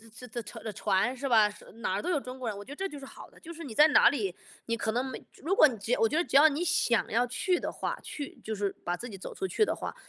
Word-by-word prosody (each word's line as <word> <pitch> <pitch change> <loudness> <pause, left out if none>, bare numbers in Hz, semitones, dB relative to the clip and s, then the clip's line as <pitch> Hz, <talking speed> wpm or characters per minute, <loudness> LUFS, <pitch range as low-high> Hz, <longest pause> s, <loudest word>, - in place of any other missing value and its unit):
这 250 - -10
的 235 +1 -5
的 215 -2 -7
船， 205 +6 +1
是 275 +1 -3
吧？ 220 -3 +6 0.3
哪 220 -4 -2
儿 200 - -1
都 - - -3
有 330 - +2
中 255 -1 -9
国 240 -3 -2
人， 205 - -5
我 205 - -9
觉 - - -11
得 - - -6
这 390 +5 -2
就 295 - -8
是 275 - -9
好 - - -12
的， - - -20
就 335 +1 -9
是 330 +1 -9
你 240 -7 -8
在 300 +5 +8
哪 - - +7
里， 200 -10 -2 0.3
你 230 - 0
可 225 -1 -1
能 245 +3 0
美 260 - -7
如 360 +7 -1
果 310 - +8
你 235 -5 -5
只 215 +4 -5
要 - - +2
我 225 - +4
觉 310 - 0
得 340 - +3
只 275 - -5
要 305 +3 +8
你 300 +4 -2
想 330 -9 +2
要 240 +3 +2
去 355 +8 0
的 - - -3
话， - - -4
去 285 -2 -7
就 220 0 -3
是， 200 -1 -1
把 175 0 -1
自 245 - -7
己 200 -4 -8
走 - - -8
出 380 - -2
去 430 - +2
的 - - 0
话， - - -6
250 Hz, 345 characters per minute, -29 LUFS, 220-300 Hz, 0.3 s, 在